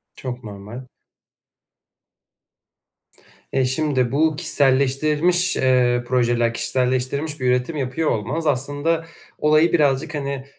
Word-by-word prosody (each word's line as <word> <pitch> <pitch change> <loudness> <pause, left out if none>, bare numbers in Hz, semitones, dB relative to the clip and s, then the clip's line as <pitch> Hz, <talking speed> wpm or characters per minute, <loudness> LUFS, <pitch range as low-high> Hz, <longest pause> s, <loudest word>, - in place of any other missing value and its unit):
Çok 125 -2 -7
normal. 105 +4 -9 2.7
Eee, 130 -1 +2
şimdi 130 -2 0
bu 155 +3 +2
kişiselleştirilmiş, 150 +4 +2
eee, 125 -2 +2
projeler, 120 -2 +1
kişiselleştirilmiş 130 +5 -1
bir 130 - -1
üretim 125 +5 0
yapıyor 140 +4 -1
olmanız, 155 +10 -2
aslında 145 +4 -1 0.3
olayı 155 +3 +3
birazcık, 150 0 +1
hani, 140 -2 -4
135 Hz, 95 wpm, -21 LUFS, 125-155 Hz, 2.7 s, olayı